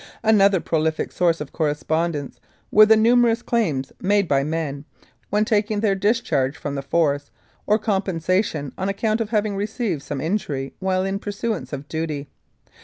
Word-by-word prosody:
Another 200 Hz, -3 st, +5 dB
prolific 160 Hz, -1 st, -1 dB
source 170 Hz, -2 st, +1 dB
of 150 Hz, -2 st, -6 dB
correspondence 155 Hz, -1 st, -1 dB, 0.3 s
were 215 Hz, 0 st, +7 dB
the 220 Hz, 0 st, +6 dB
numerous 235 Hz, +1 st, +4 dB
claims 155 Hz, -, 0 dB
made 200 Hz, 0 st, +2 dB
by 140 Hz, -2 st, +2 dB
men, 150 Hz, -2 st, -3 dB, 0.5 s
when 210 Hz, +1 st, +2 dB
taking 210 Hz, 0 st, +1 dB
their 210 Hz, -3 st, +2 dB
dis 205 Hz, +4 st, +2 dB
charge 135 Hz, -, 0 dB
from 145 Hz, -, -5 dB
the 140 Hz, -, -3 dB
Force, 145 Hz, 0 st, 0 dB, 0.4 s
for 210 Hz, -, +4 dB
compensation 185 Hz, -, -1 dB
on 190 Hz, +1 st, -1 dB
account 215 Hz, +3 st, 0 dB
of 220 Hz, -, -2 dB
having 210 Hz, -2 st, 0 dB
received 205 Hz, -, -2 dB
some 140 Hz, 0 st, -5 dB
injury 145 Hz, -5 st, -2 dB
while 190 Hz, 0 st, 0 dB
in 195 Hz, +1 st, -2 dB
pursuance 210 Hz, 0 st, -4 dB
of 140 Hz, 0 st, -6 dB
duty. 155 Hz, -3 st, -3 dB
185 Hz, 160 wpm, -22 LUFS, 150-210 Hz, 0.5 s, were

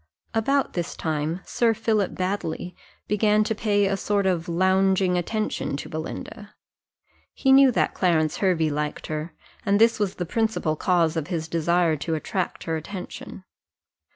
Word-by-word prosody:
About 270 Hz, +5 st, +1 dB
this 175 Hz, -1 st, -3 dB
time 160 Hz, +2 st, -2 dB
Sir 230 Hz, -2 st, +1 dB
Philip 215 Hz, -2 st, 0 dB
Baddely 185 Hz, -2 st, -3 dB, 0.3 s
began 210 Hz, 0 st, +3 dB
to 220 Hz, -, -1 dB
pay 205 Hz, -2 st, +1 dB
a 195 Hz, 0 st, +1 dB
sort 200 Hz, 0 st, 0 dB
of 175 Hz, -3 st, 0 dB
lounging 190 Hz, +1 st, +2 dB
attention 180 Hz, -5 st, -2 dB
to -, -, -6 dB
Belinda: 160 Hz, +6 st, -7 dB, 0.8 s
he 270 Hz, -, +2 dB
knew 270 Hz, -1 st, +7 dB
that -, -, +1 dB
Clarence 160 Hz, -4 st, +1 dB
Hervey 165 Hz, -5 st, +1 dB
liked 150 Hz, +1 st, -3 dB
her, 155 Hz, +2 st, -5 dB, 0.3 s
and 200 Hz, +1 st, +2 dB
this 230 Hz, 0 st, +4 dB
was 200 Hz, -2 st, -1 dB
the 180 Hz, -, -3 dB
principal 220 Hz, -5 st, 0 dB
cause 170 Hz, -1 st, +2 dB
of 160 Hz, -2 st, -2 dB
his 165 Hz, -3 st, -3 dB
desire 170 Hz, 0 st, +2 dB
to 160 Hz, +3 st, -2 dB
attract 180 Hz, +3 st, -3 dB
her 165 Hz, -1 st, -2 dB
attention. 185 Hz, +2 st, -8 dB
185 Hz, 155 wpm, -24 LUFS, 165-210 Hz, 0.8 s, knew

